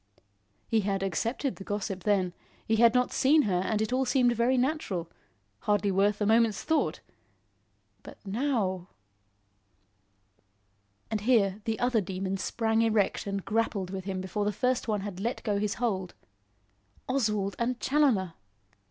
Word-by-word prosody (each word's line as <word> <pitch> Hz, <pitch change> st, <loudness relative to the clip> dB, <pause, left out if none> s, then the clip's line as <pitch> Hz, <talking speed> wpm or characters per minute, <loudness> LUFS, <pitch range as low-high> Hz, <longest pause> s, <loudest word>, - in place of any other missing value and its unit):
He 225 Hz, -, +2 dB
had 195 Hz, -1 st, -1 dB
accepted 230 Hz, -, -2 dB
the 195 Hz, -, -8 dB
gossip 195 Hz, -2 st, -4 dB
then; 190 Hz, -4 st, +2 dB, 0.3 s
he 220 Hz, -, +1 dB
had 235 Hz, +1 st, +5 dB
not 250 Hz, 0 st, +2 dB
seen 295 Hz, +3 st, +4 dB
her 185 Hz, -4 st, +1 dB
and 215 Hz, +2 st, 0 dB
it 220 Hz, -, -3 dB
all 260 Hz, +1 st, +2 dB
seemed 250 Hz, -1 st, +3 dB
very 240 Hz, +3 st, +2 dB
natural; 245 Hz, -, -1 dB, 0.5 s
hardly 205 Hz, -1 st, +1 dB
worth 200 Hz, +2 st, +2 dB
a 210 Hz, -, +1 dB
moment's 225 Hz, -1 st, +3 dB
thought. 300 Hz, -, 0 dB, 1.0 s
But -, -, -12 dB
now! 200 Hz, -5 st, -1 dB, 2.2 s
And 215 Hz, -2 st, -1 dB
here, 210 Hz, -4 st, +2 dB
the 225 Hz, -1 st, -1 dB
other 245 Hz, -3 st, +2 dB
Demon 190 Hz, +1 st, -3 dB
sprang 225 Hz, +2 st, 0 dB
erect 215 Hz, -3 st, +1 dB
and 200 Hz, -1 st, -3 dB
grappled 210 Hz, -4 st, -1 dB
with 190 Hz, -1 st, -5 dB
him 190 Hz, -1 st, -3 dB
before 190 Hz, +2 st, -2 dB
the 210 Hz, -, +1 dB
first 250 Hz, +4 st, 0 dB
one 210 Hz, -2 st, 0 dB
had 195 Hz, -2 st, -6 dB
let 235 Hz, +5 st, -3 dB
go 205 Hz, -3 st, 0 dB
his 210 Hz, 0 st, -1 dB
hold. 190 Hz, -7 st, -2 dB, 0.9 s
Oswald 215 Hz, -7 st, 0 dB
and 245 Hz, +1 st, -1 dB
Challoner! 255 Hz, -, +2 dB
210 Hz, 150 wpm, -28 LUFS, 195-240 Hz, 2.2 s, had